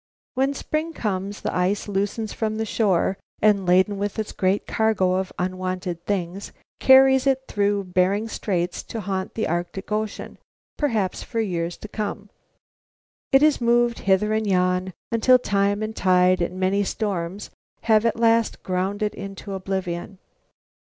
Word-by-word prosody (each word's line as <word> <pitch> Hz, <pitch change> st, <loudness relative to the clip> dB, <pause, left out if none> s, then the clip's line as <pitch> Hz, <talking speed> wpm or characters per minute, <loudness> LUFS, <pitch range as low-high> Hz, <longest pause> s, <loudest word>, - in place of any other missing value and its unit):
When 270 Hz, +2 st, 0 dB
spring 310 Hz, +4 st, -3 dB
comes 200 Hz, -4 st, -3 dB
the -, -, -3 dB
ice 185 Hz, +4 st, 0 dB
loosens 205 Hz, +2 st, -2 dB
from 215 Hz, -1 st, -2 dB
the 220 Hz, 0 st, -2 dB
shore, 195 Hz, -3 st, +1 dB, 0.2 s
and, 205 Hz, -3 st, +3 dB
laden 190 Hz, +3 st, +3 dB
with 205 Hz, 0 st, -3 dB
its 215 Hz, -1 st, -3 dB
great 190 Hz, +1 st, 0 dB
cargo 215 Hz, -5 st, +1 dB
of 185 Hz, 0 st, -1 dB
unwanted 185 Hz, -1 st, -3 dB
things, 195 Hz, -1 st, -3 dB, 0.3 s
carries 265 Hz, 0 st, +6 dB
it 265 Hz, -1 st, +2 dB
through 200 Hz, 0 st, 0 dB
Bering 185 Hz, +4 st, +1 dB
Straits 180 Hz, -5 st, -2 dB
to 225 Hz, -, -6 dB
haunt 190 Hz, -1 st, -3 dB
the 220 Hz, -, -1 dB
Arctic 175 Hz, +4 st, -4 dB
Ocean, 215 Hz, 0 st, -3 dB, 0.4 s
perhaps 220 Hz, -11 st, -1 dB
for 230 Hz, -, -4 dB
years 175 Hz, -5 st, -2 dB
to -, -, -9 dB
come. 210 Hz, -1 st, -5 dB, 1.0 s
It 270 Hz, +2 st, +6 dB
is 305 Hz, -4 st, +3 dB
moved 240 Hz, 0 st, +2 dB
hither 200 Hz, +2 st, +2 dB
and 220 Hz, 0 st, 0 dB
yon 185 Hz, 0 st, +1 dB, 0.2 s
until 230 Hz, +3 st, +5 dB
time 200 Hz, -3 st, 0 dB
and 220 Hz, 0 st, -4 dB
tide 180 Hz, 0 st, +3 dB
and 180 Hz, +2 st, -2 dB
many 190 Hz, +2 st, +2 dB
storms 195 Hz, -2 st, -3 dB, 0.3 s
have 220 Hz, -1 st, +3 dB
at 230 Hz, -2 st, +1 dB
last 230 Hz, -1 st, +2 dB
ground 190 Hz, +3 st, -1 dB
it 210 Hz, -, -1 dB
into 195 Hz, 0 st, -7 dB
oblivion. 190 Hz, -1 st, -4 dB
200 Hz, 155 wpm, -23 LUFS, 185-220 Hz, 1.0 s, carries